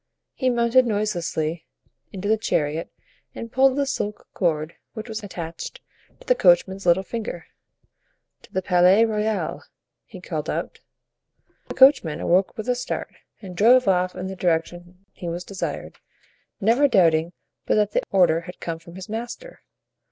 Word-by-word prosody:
He 260 - 0
mounted 240 +1 +3
noiselessly 175 -7 -2 0.4
into 195 +1 -5
the 220 - +4
chariot 160 -7 -1 0.4
and 230 - -7
pulled 265 +1 +3
the 285 - +2
silk 210 -6 -4
cord 160 -3 -1 0.2
which 220 0 -7
was 220 -1 -5
attached 175 - -7 0.4
to - - -17
the - - +4
coachman's 190 - +3
little 175 +2 +4
finger. 210 -4 -5 1.0
"To - - -19
the 190 - -2
Palais 180 +4 +5
Royal," 215 -1 -2 0.4
he - - -11
called - - -5
out. - - -4 0.9
The - - -7
coachman 260 - +5
awoke 185 +2 +1
with 220 - -5
a 250 - +3
start 245 0 -4 0.3
and 185 -2 -8
drove 240 +5 +5
off 180 -1 +2
in 185 0 -5
the 190 0 -5
direction 175 +1 -2
he 175 - -6
was 175 +1 -4
desired, 195 0 -6 0.6
never 230 +7 +4
doubting 170 - +3 0.3
but - - +3
that 210 -1 +2
the - - +1
order 175 -4 +3
had 180 +1 -11
come 165 -1 -4
from 170 +1 -14
his 190 -1 -8
master. 240 - -7
190 Hz, 155 wpm, -23 LUFS, 175-230 Hz, 1.0 s, Palais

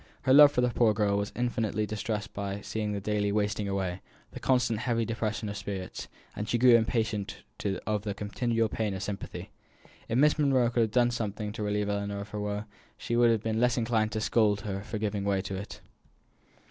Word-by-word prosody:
Her 130 - +4
love 145 0 +9
for 125 - +1
the 125 - +3
poor 115 -3 +3
girl 105 -1 +2
was 100 +1 -2
infinitely 115 -3 -1
distressed 105 0 -4
by 100 0 -4
seeing 105 0 -3
the 100 - -2
daily 105 0 0
wasting 105 0 0
away, 95 -2 -2 0.3
the - - -8
constant 125 -4 +1
heavy 115 -2 0
depression 110 -1 -2
of 100 - -4
spirits, 95 -3 -5 0.3
and 105 +1 -4
she 120 - +2
grew 125 +1 +6
impatient 110 -3 0 0.4
of 105 -1 0
the 100 -1 -4
continual 115 +2 0
pain 105 -2 -2
of 95 - -4
sympathy. 100 0 -6 0.6
If 115 - +1
Miss 150 +3 +4
Monro 130 -5 +3
could 120 - +2
have 110 - +2
done 120 0 +3
something 105 -3 -3
to 110 - -7
relieve 105 0 0
Ellinor 100 0 -2
of 100 - -8
her 105 - -5
woe, 105 0 -2 0.3
she 120 - -3
would 120 0 +5
have 110 -2 +1
been 110 0 -1
less 125 +1 +3
inclined 115 -2 +1
to 110 - -2
scold 105 -2 +2
her 100 -2 -4
for 110 +2 -5
giving 105 -1 -2
way 100 -1 +1
to 95 0 -4
it. 100 +2 -7
105 Hz, 210 wpm, -29 LUFS, 100-115 Hz, 0.6 s, love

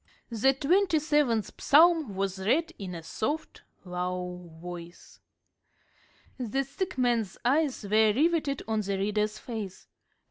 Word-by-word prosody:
The 235 +4 +3
twenty 345 +5 +3
seventh 295 -8 +1
Psalm 315 - +5
was 195 0 -2
read 300 - +1
in 185 -3 -5
a 165 - -7
soft, 290 - -3 0.2
low 180 0 -4
voice. 175 0 -10 1.2
The 255 +3 -1
sick 365 +4 -5
man's 235 -6 +1
eyes 280 -1 +2
were 215 +1 +4
riveted 295 +2 +1
on 220 -1 0
the 200 -1 -2
reader's 210 +2 0
face. 215 -5 -7
220 Hz, 120 wpm, -28 LUFS, 195-295 Hz, 1.2 s, Psalm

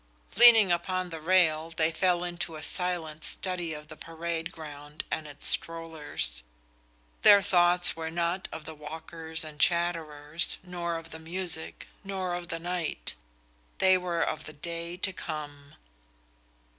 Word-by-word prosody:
Leaning 225 -4 +9
upon 180 +1 -1
the 165 - -5
railing, 165 -2 +3
they 160 0 +3
fell 175 +1 +2
into 175 -2 -4
a 155 - -8
silent 170 -4 -2
study 175 +1 -2
of 150 0 -7
the 155 - -10
parade 165 +1 -4
ground 150 -1 -8
and 155 - -2
its 145 -1 -6
strollers. 160 - -1 0.8
Their 200 -1 +8
thoughts 175 -2 +4
were 160 0 -4
not 170 +3 -1
of 160 -1 -7
the 160 - -7
walkers 160 +2 -5
and 155 -1 -9
chatterers, 165 -3 0
nor 175 -2 -3
of 165 0 -10
the 160 - -7
music, 170 0 -1 0.2
nor 190 -2 -3
of 175 0 -4
the 165 - -3
night. 175 -1 -3 0.6
They 190 0 +5
were 180 -2 0
of 155 - -2
the 155 - -8
day 170 +2 -5
to 190 +1 0
come. 145 -4 -7
165 Hz, 145 wpm, -29 LUFS, 155-180 Hz, 0.8 s, Leaning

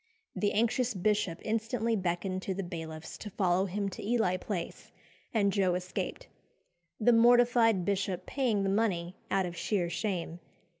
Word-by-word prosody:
The 205 - 0
anxious 235 +2 +1
bishop 195 -3 +1
instantly 225 +1 0
beckoned 185 0 -2
to 190 0 -3
the 195 - -3
bailiffs 160 -3 -7
to 210 - -6
follow 185 -1 +1
him 200 +2 -2
to 185 - -8
Ely 215 -4 +1
Place, 185 -1 -5 0.4
and 200 -3 +2
Joe 185 -3 +2
escaped; 180 0 -4 0.7
the 240 +2 +5
mortified 235 -4 +5
bishop 195 -2 -1
paying 235 -7 0
the 195 - +1
money 190 -4 0
out 195 -1 +2
of 175 -1 -5
sheer 175 -1 -1
shame. 175 -5 -3
195 Hz, 150 wpm, -30 LUFS, 180-225 Hz, 0.7 s, the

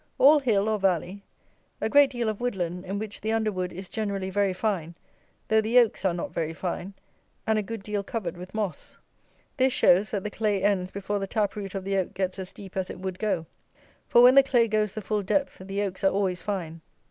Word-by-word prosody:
All 295 +2 +7
hill, 215 -7 +1
or 215 -1 +1
valley. 190 +1 0 0.6
A - - 0
great 285 +4 +6
deal 240 -3 -2
of 215 +1 -2
wood 245 -3 -1
land, 180 0 -3
in 195 +2 -3
which 210 0 -5
the 220 - -1
underwood 210 -5 -1
is 185 +2 -7
generally 200 -3 -3
very 200 0 +2
fine, 185 -4 -2 0.5
though 220 0 +4
the 225 +3 +1
oaks 230 -5 +4
are 185 - +3
not 175 - -5
very 160 -1 -2
fine, 185 +2 -4 0.5
and 220 -1 +2
a - - +1
good 220 0 -6
deal 210 0 -2
covered 195 -5 -4
with 180 +3 -10
moss. 210 -5 -4 0.6
This 260 -1 +3
shows, 190 +4 +4
that 200 -3 -2
the 210 - -4
clay 205 -3 0
ends 195 -3 +1
before 200 +1 -3
the 195 - -3
tap 205 -1 0
root 200 -2 -6
of 190 -1 -4
the 195 0 0
oak 185 - -2
gets 190 0 -2
as 185 -1 -6
deep 195 -2 -12
as 190 -1 -1
it - - -7
would 185 -1 -5
go; 190 -6 -1 0.6
for, 240 - +6
when 250 +1 +9
the 275 - +9
clay 245 -4 +3
goes 215 -2 0
the 215 - -5
full 210 +1 -1
depth, 275 +9 -1
the 195 +2 -3
oaks 190 -1 -4
are 195 - +6
always 190 -2 0
fine. 170 -5 -4
200 Hz, 230 wpm, -26 LUFS, 185-220 Hz, 0.6 s, when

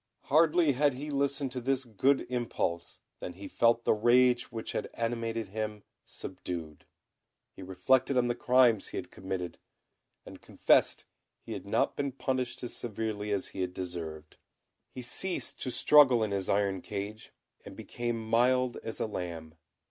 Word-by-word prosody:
Hardly 160 +1 +4
had 140 +1 +2
he 145 +3 -5
listened 140 -1 0
to 125 - -4
this 130 +1 0
good 130 +5 +2
impulse 115 -8 -3 0.2
than 90 - -6
he 100 +2 -9
felt 115 0 +3
the - - +3
rage 120 +3 +3
which 115 -1 -5
had - - -3
animated 115 -2 -2
him 105 0 -4 0.2
subdued, 85 -5 -7 0.7
he - - -11
reflected 125 +9 +2
on 120 -1 +3
the 120 - +1
crimes 120 -3 +4
he - - -6
had - - -6
committed, 90 -2 -5 0.7
and - - -11
confessed - - +2 0.4
he - - -6
had - - -7
not - - +1
been 140 -1 -2
punished 130 -2 -3
as 120 - -5
severely 110 -2 -3
as 100 -2 -1
he 95 - -5
had 90 0 -3
deserved. 80 -4 -6 0.5
He 130 - -8
ceased 180 +9 -2
to 130 - -2
struggle 130 -3 +6
in 105 - -1
his 95 -2 -2
iron 100 -2 +1
cage, 105 +3 -6 0.3
and - - -10
became 120 -2 -4
mild 125 +2 +3
as 115 - -6
a - - 0
lamb. 85 -6 -6
115 Hz, 160 wpm, -30 LUFS, 95-130 Hz, 0.7 s, struggle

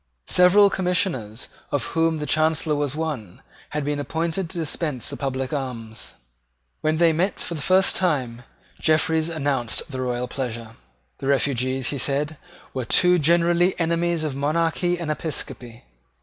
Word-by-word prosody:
Several 195 +3 +6
Commissioners, 180 - -1 0.2
of 145 - 0
whom 165 -1 +2
the 150 - -3
Chancellor 155 0 +2
was 145 -1 -1
one, 145 - -5 0.3
had 150 -1 -3
been 145 0 -1
appointed 165 +5 -2
to 180 - -7
dispense 155 -5 -2
the - - -4
public 130 -1 -3
alms. 115 -5 -5 0.6
When 155 0 0
they 165 -1 +4
met 180 +5 0
for - - -2
the 155 - -5
first 185 +4 +4
time, 130 -10 0 0.4
Jeffreys 160 +1 +2
announced 140 -5 0
the 130 -1 -4
royal 125 0 -2
pleasure. 115 -4 -5 0.4
The 135 - -4
refugees, 130 -2 +1
he 140 - -3
said, 145 +4 -1 0.4
were 130 -2 -3
too 180 +7 +4
generally 170 +3 +3
enemies 170 0 0
of 150 -4 -2
monarchy 165 +5 0
and 170 -3 -3
episcopacy. 125 -6 -4
150 Hz, 150 wpm, -23 LUFS, 130-170 Hz, 0.6 s, Several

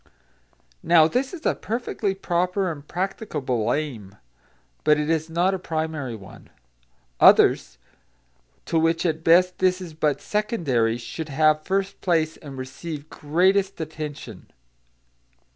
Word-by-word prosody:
Now 165 -2 +5
this 255 +9 -1
is 340 -3 -9
a - - +3
perfectly 220 -3 -3
proper 180 0 0
and 145 -2 -10
practicable 155 - -2
aim, 120 -10 -4 0.7
but 150 0 +4
it 150 +2 0
is 160 0 -1
not 175 +4 +1
a 190 - -2
primary 155 -7 -3
one. 95 -3 -13 0.7
Others, 65 -1 +5 0.9
to 165 - +1
which 165 +2 +1
at 160 -1 -1
best 180 +2 +4
this 185 0 +2
is 175 -4 -8
but 155 -2 0
secondary, 150 - 0
should 155 +7 -7
have 155 +2 +3
first 195 +2 -2
place 160 -3 +1
and 140 -3 -10
receive 145 +3 -7
greatest 190 +6 +1
attention. 150 - -7
160 Hz, 125 wpm, -24 LUFS, 145-185 Hz, 0.9 s, Now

